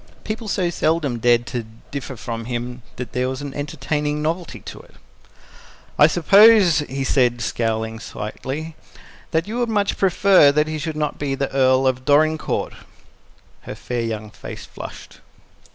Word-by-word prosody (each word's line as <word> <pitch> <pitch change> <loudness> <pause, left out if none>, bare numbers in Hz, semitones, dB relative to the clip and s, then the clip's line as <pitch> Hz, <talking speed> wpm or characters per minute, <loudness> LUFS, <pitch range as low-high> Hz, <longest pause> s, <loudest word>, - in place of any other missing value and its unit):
People 220 +1 -5
so 185 -3 0
seldom 155 -7 0
dared 120 0 +3
to 120 -3 -5 0.2
differ 140 -1 -5
from 115 0 -5
him 125 +1 -4
that 125 0 -6
there 125 +1 -1
was 130 +2 -5
an 140 -1 -6
entertaining 150 +1 -2
novelty 165 +3 -3
in - - -8
it. - - -23 1.0
"I 150 - +8
suppose," 190 +1 +6
he 135 -2 -3
said, 125 -3 +2
scowling 110 0 -2
slightly, 140 +9 -6 0.5
"that 165 +2 0
you 230 +3 -3
would 240 -1 0
much 205 -2 0
prefer 190 -5 +5
that 150 +1 +3
he 155 0 -3
should 155 +1 -4
not 150 -1 -2
be 140 -2 -1
the 140 0 -2
Earl 130 0 +3
of 130 -1 +1
Dorincourt." 155 +2 +1 0.9
Her - - -8
fair 120 -1 -4
young 110 -2 -4
face - - -9
flushed. - - -10
145 Hz, 155 wpm, -21 LUFS, 125-160 Hz, 1.0 s, I